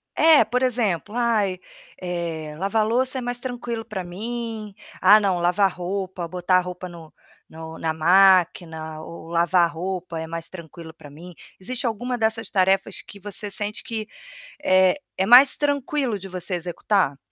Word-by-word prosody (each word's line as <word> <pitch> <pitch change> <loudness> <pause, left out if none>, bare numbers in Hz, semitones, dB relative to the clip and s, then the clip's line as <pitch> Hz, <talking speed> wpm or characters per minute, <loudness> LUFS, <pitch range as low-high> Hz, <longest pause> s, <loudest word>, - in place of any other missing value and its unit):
É, 315 -7 +6
por 245 +4 -1
exemplo: 220 -6 -1
"Ai, 220 -6 +1 0.4
eh, 170 -4 -4
lavar 205 +3 +1
louça 255 +4 0
é - - -2
mais 245 0 -4
tranquilo 240 -2 -5
para 210 -4 -5
mim. 220 +2 -6 0.3
Ah, 205 +3 +8
não, 190 -4 0
lavar 180 +2 +2
roupa, 185 0 -4
botar 180 +1 +1
a - - +3
roupa 180 0 -7
no 165 -3 -12 0.4
no 160 0 -9
na 160 -1 -1
máquina 165 -2 +3
ou 165 0 -10
lavar 170 0 +2
roupa 175 0 -5
é 160 - -5
mais 165 0 -6
tranquilo 165 -2 -11
para 150 -3 -14
mim". 170 +5 -12 0.3
Existe 250 +6 -3
alguma 245 +3 -2
dessas 220 -1 -1
tarefas 195 0 +1
que 200 - -14
você 205 +1 -6
sente 205 +1 -3
que, 220 -2 -5 0.6
eh, 185 -6 +4 0.2
é 190 - +1
mais 255 +3 +8
tranquilo 285 -5 -1
de 195 0 -9
você 185 0 -3
executar? 175 -3 0
190 Hz, 160 wpm, -23 LUFS, 170-225 Hz, 0.6 s, Ah